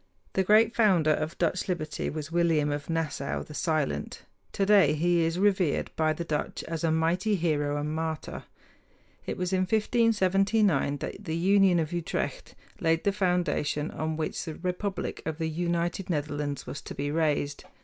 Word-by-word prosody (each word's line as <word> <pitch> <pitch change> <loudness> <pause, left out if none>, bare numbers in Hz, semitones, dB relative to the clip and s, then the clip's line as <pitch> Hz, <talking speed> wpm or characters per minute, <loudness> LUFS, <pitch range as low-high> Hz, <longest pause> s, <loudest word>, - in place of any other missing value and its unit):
The 190 - +2
great 215 +4 +4
founder 185 -9 +4
of 155 +2 -3
Dutch 175 +2 0
liberty 165 -5 -2
was 155 0 -5
William 165 -4 +2
of 145 +1 -4
Nassau, 160 -4 -2
the 150 - -11
Silent. 150 - -2 0.3
Today 195 -7 +4
he 170 +2 +2
is 165 +1 0
revered 190 -5 +1
by 155 -1 +2
the 155 +2 -3
Dutch 150 -3 -3
as 165 -1 -5
a 165 - +2
mighty 175 +6 +1
hero 145 -4 0
and 150 +1 -2
martyr. 160 0 -4 0.8
It - - -3
was 180 +1 -2
in 185 - +2
1579 195 - +2
that 195 - -6
the 160 -1 -2
Union 190 0 +4
of 160 0 -2
Utrecht 170 -1 -3 0.2
laid 165 0 +1
the 200 - +3
foundation 180 -6 0
on 155 0 -3
which 155 - -3
the 160 -3 -6
republic 185 +1 -3
of 160 -1 -4
the 160 -1 -1
United 175 +3 -2
Netherlands 145 -2 -2
was 145 - -6
to - - -8
be 145 +1 -2
raised. 150 -2 0
165 Hz, 165 wpm, -28 LUFS, 155-185 Hz, 0.8 s, great